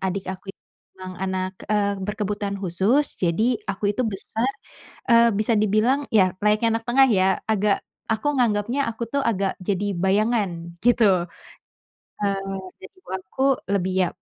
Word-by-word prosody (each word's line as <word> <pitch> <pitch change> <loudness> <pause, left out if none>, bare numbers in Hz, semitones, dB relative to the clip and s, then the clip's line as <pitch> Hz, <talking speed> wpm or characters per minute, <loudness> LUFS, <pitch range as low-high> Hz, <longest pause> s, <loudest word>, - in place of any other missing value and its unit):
adik 190 0 -2
aku 190 +1 -7
itu - - -9 0.4
memang 185 0 -8
anak, 185 0 -2 0.2
eee, 200 -2 +1
berkebutuhan 205 0 -3
khusus, 195 - 0
jadi 215 +8 +1
aku 200 +1 0
itu 240 +2 -1
besar, 220 +4 -2 0.6
eee, 235 -2 +6
bisa 215 +2 +1
dibilang 215 +7 +2
ya 185 -3 +4
layaknya 220 +2 +3
anak 225 - -18
tengah 265 +2 +5
ya, 190 -2 +2
agak 210 -1 +1 0.2
aku 250 +7 0
nganggepnya 235 +3 +1
aku 230 0 -5
tuh 280 - 0
agak 195 -4 0
jadi 195 +1 -2
bayangan, 190 -4 0
gitu. 200 -7 +4 0.9
Eee, 195 -1 -2 0.2
dan - - -10
ibu - - -24
aku 190 +8 -5 0.3
lebih 190 -2 0
ya, - - 0
205 Hz, 150 wpm, -23 LUFS, 190-225 Hz, 0.9 s, eee